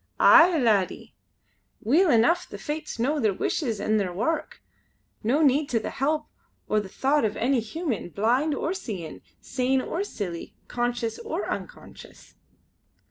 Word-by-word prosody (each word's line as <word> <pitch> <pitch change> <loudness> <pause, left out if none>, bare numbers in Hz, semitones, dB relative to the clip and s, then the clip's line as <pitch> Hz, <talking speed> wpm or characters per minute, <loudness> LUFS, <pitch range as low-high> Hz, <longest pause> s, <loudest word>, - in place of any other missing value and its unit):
"Aye! 335 0 +7
laddie. 215 -8 +1 0.7
Weel 320 - +3
eneuch 270 +9 +3
the - - -7
Fates 305 0 -5
know 280 +6 0
their 215 -6 +1
wishes 230 - -1
an' 215 +1 +1
their 195 -4 -1
wark, 235 - -2 0.6
no 255 +8 +1
to - - +5
need 280 +2 +2
the 230 -3 -1
help 300 +3 -1 0.4
or 215 - +2
the 200 -2 -6
thocht 275 +7 +1
of 215 -1 -1
any 255 +2 +2
human 235 - -4
blind 245 - +1
or 335 - -2
seein', 195 - -6 0.2
sane 260 0 0
or 335 +8 -2
silly, 185 - -6
conscious 240 -2 -2
or 460 - -4
unconscious." - - -8
250 Hz, 145 wpm, -26 LUFS, 215-305 Hz, 0.7 s, Aye